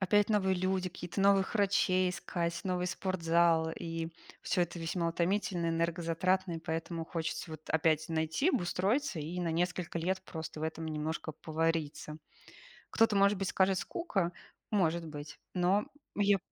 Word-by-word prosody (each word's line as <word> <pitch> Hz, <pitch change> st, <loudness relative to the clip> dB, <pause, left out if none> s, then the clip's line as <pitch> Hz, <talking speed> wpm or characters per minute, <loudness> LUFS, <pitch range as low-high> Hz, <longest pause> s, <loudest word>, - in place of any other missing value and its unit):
опять 205 Hz, +2 st, +3 dB
новые 190 Hz, -3 st, +3 dB
люди, 185 Hz, 0 st, 0 dB
какие-то 180 Hz, +2 st, -5 dB
новых 195 Hz, +1 st, +4 dB
врачей 190 Hz, -3 st, +3 dB
искать, 170 Hz, -1 st, -2 dB
новый 180 Hz, -1 st, -1 dB
спортзал, 170 Hz, -3 st, +2 dB
и 165 Hz, -1 st, -4 dB, 0.3 s
всё 180 Hz, -, +1 dB
это 175 Hz, 0 st, -4 dB
весьма 170 Hz, +1 st, -1 dB
утомительно, 175 Hz, 0 st, 0 dB
энергозатратно, 170 Hz, +2 st, +1 dB
и 165 Hz, -, -3 dB
поэтому 165 Hz, +1 st, -3 dB
хочется 160 Hz, 0 st, -3 dB
вот 155 Hz, 0 st, -9 dB
опять 160 Hz, 0 st, +2 dB
найти, 160 Hz, -, +1 dB
обустроиться 200 Hz, -, 0 dB
и 165 Hz, +4 st, -3 dB
на 170 Hz, -2 st, 0 dB
несколько 175 Hz, 0 st, -1 dB
лет 190 Hz, +3 st, -1 dB
просто 160 Hz, -1 st, -6 dB
в -, -, -5 dB
этом 160 Hz, 0 st, -3 dB
немножко 155 Hz, +1 st, -3 dB
повариться. 160 Hz, -1 st, -2 dB, 0.7 s
Кто-то, 225 Hz, -2 st, +4 dB
может 200 Hz, 0 st, +5 dB
быть, 195 Hz, -, -1 dB
скажет: 190 Hz, 0 st, +3 dB
"Скука". 195 Hz, -, -1 dB, 0.4 s
Может 170 Hz, -4 st, +1 dB
быть. 145 Hz, -1 st, -8 dB, 0.2 s
Но 185 Hz, +3 st, +3 dB, 0.3 s
я 205 Hz, -1 st, +4 dB
175 Hz, 145 wpm, -32 LUFS, 165-190 Hz, 0.7 s, может